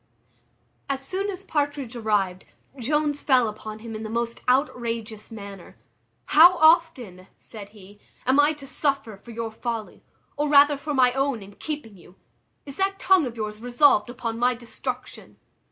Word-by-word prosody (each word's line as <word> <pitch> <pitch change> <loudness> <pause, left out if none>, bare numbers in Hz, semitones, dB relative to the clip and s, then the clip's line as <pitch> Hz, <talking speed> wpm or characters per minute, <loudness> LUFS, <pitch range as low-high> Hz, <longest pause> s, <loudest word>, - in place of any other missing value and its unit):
As 270 -1 -2
soon 390 +6 -2
as 385 -1 -6
Partridge 290 -7 -2
arrived, 205 -5 -1 0.3
Jones 295 +3 0
fell 255 -4 +3
upon 215 0 -7
him 225 +1 -9
in 215 - -6
the 220 - -5
most 235 +1 -3
outrageous 230 -5 -1
manner. 200 -4 -10 0.5
"How 345 +4 +7
often," 290 - +3
said 205 -3 -10
he, 205 -1 -16 0.3
"am 260 +3 +3
I 295 +2 +5
to 290 -2 -11
suffer 275 -6 -1
for 200 +5 -17
your 230 -1 -5
folly, 225 -1 -5 0.3
or 295 0 0
rather 290 0 +6
for 290 +1 -4
my 250 -2 +4
own 270 -5 -1
in 200 +1 -13
keeping 290 -6 -6
you? 175 +2 -18 0.5
is 275 -1 -8
that 390 0 0
tongue 375 -7 +3
of 235 -1 -8
yours 215 0 -5
resolved 245 -1 +3
upon 230 -2 -5
my 250 +1 +2
destruction?" 235 0 -7
245 Hz, 160 wpm, -24 LUFS, 220-290 Hz, 0.5 s, How